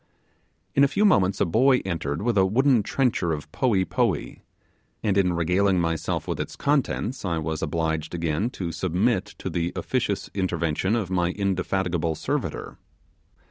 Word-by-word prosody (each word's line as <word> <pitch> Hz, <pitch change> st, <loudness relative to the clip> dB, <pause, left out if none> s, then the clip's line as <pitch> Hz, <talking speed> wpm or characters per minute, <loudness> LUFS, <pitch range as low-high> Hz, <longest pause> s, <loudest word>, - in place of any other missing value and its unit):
In 140 Hz, -, +4 dB
a -, -, +6 dB
few 200 Hz, +10 st, +1 dB
moments 100 Hz, -, +3 dB
a -, -, +3 dB
boy 125 Hz, +9 st, +3 dB
entered 80 Hz, -2 st, -2 dB
with 120 Hz, -1 st, +1 dB
a 95 Hz, -, +5 dB
wooden 125 Hz, +5 st, +3 dB
trencher 110 Hz, -6 st, 0 dB
of 75 Hz, 0 st, -6 dB
poee 100 Hz, -5 st, +1 dB
poee; -, -, -1 dB, 0.6 s
and 100 Hz, -3 st, +1 dB
in 95 Hz, -3 st, +3 dB
regaling 90 Hz, +3 st, +2 dB
myself 85 Hz, -2 st, -1 dB
with -, -, -3 dB
its -, -, -4 dB
contents 135 Hz, -3 st, 0 dB
I 85 Hz, -4 st, -1 dB
was 80 Hz, 0 st, -3 dB
obliged 80 Hz, 0 st, -2 dB
again 85 Hz, +6 st, -1 dB
to 85 Hz, -3 st, -3 dB
submit 95 Hz, +5 st, 0 dB
to -, -, -6 dB
the 85 Hz, -1 st, -1 dB
officious 125 Hz, -6 st, -1 dB
intervention 90 Hz, +1 st, 0 dB
of 100 Hz, -6 st, -2 dB
my 90 Hz, -2 st, +1 dB
indefatigable 90 Hz, -4 st, -1 dB
servitor. -, -, -3 dB
95 Hz, 155 wpm, -25 LUFS, 85-110 Hz, 0.6 s, a